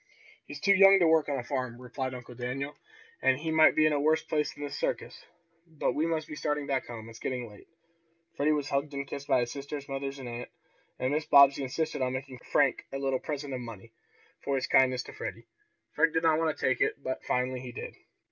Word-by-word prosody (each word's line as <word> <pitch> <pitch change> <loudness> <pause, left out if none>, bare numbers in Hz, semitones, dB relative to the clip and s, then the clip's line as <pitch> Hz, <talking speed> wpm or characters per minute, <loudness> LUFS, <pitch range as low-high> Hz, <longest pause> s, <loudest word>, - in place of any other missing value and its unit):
"He's 145 - -8
too 200 +6 +4
young 195 0 +8
to 180 - +4
work 160 -2 +3
on 140 - 0
a 125 - -3
farm," 125 -3 -3
replied 130 +1 -4
Uncle 125 0 -9
Daniel. 130 +4 -4 0.5
"And 130 - +3
he 160 +3 -3
might 160 0 +6
be 155 - +4
in 155 - +3
a 145 - +1
worse 155 +2 +2
place 150 -1 -1
than 145 - -9
this 145 - -5
circus. - - -3 0.4
But 160 -3 -1
we 155 +2 0
must 160 -2 -1
be 155 - -7
starting 150 -1 -1
back 135 -2 -1
home. 115 -2 -8
It's 115 0 -11
getting 125 -2 -3
late." 105 -2 -15 0.7
Freddie 150 +2 +2
was 145 -2 0
hugged 140 +1 -1
and 140 0 -3
kissed 140 0 -7
by 125 - +3
his 120 - -2
sisters, 140 0 -6
mother 135 0 -3
and 130 -2 -7
aunt, 120 0 -6 0.5
and 130 +2 -1
Mrs. 155 +1 -2
Bobbsey 140 0 +7
insisted 145 +3 -2
on 130 0 0
making 130 -1 -6
Frank - - +1
a 135 - -3
little 135 -1 0
present 145 -2 -5
of 125 - -3
money, 115 -2 -10 0.5
for 140 - 0
his 130 - 0
kindness 130 -1 +3
to - - -11
Freddie. - - -6 0.5
Frank 160 +1 +3
did 165 - +1
not 160 -1 +4
want 160 -2 0
to - - -2
take 130 - +1
it, - - +2
but 130 - -3
finally 125 0 -1
he 125 0 -7
did. - - -7
140 Hz, 235 wpm, -29 LUFS, 130-150 Hz, 0.7 s, young